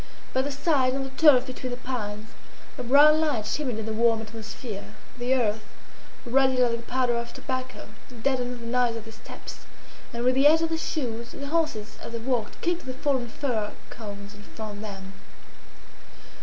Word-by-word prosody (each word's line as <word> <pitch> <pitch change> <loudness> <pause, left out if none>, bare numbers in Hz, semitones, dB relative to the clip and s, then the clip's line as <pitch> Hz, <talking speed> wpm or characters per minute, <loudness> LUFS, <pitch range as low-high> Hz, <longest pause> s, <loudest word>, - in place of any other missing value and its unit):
By 260 - +3
the 285 +2 -2
side, 270 -3 +2
on 270 - -1
the 270 - -6
turf 265 -3 +6
between 255 -1 -5
the 245 - -4
pines, 220 -4 -4 0.5
a 255 - -5
brown 290 +5 +7
light 285 -9 +1
shimmered 255 0 -1
in 220 - -3
the 220 - -2
warm 225 0 +3
atmosphere. 220 -1 -7 0.2
The 250 +2 +2
earth, 220 -4 +1 0.6
ruddy 260 +1 +3
like 245 -2 +4
the 235 - -6
powder 250 -1 +2
of 235 0 -3
tobacco, 255 -1 -4 0.4
deadened 250 -3 0
the - - -8
noise 245 0 +2
of 225 - -5
their 225 0 -11
steps, - - -10 0.4
and 235 0 -3
with 255 +1 +4
the 270 +3 +6
edge 320 +2 +5
of 330 - +1
their 325 - 0
shoes 235 -8 -3
the 280 - -6
horses 285 -9 -1
as 230 - -7
they - - -1
walked 230 -2 -2
kicked 345 -4 -1
the 255 - -4
fallen 260 -3 0
fir 225 -6 -2 0.2
cones 205 -2 -8
in 205 - -13
front 210 0 -7
of - - -8
them. 195 -2 -7
245 Hz, 190 wpm, -27 LUFS, 225-265 Hz, 0.6 s, brown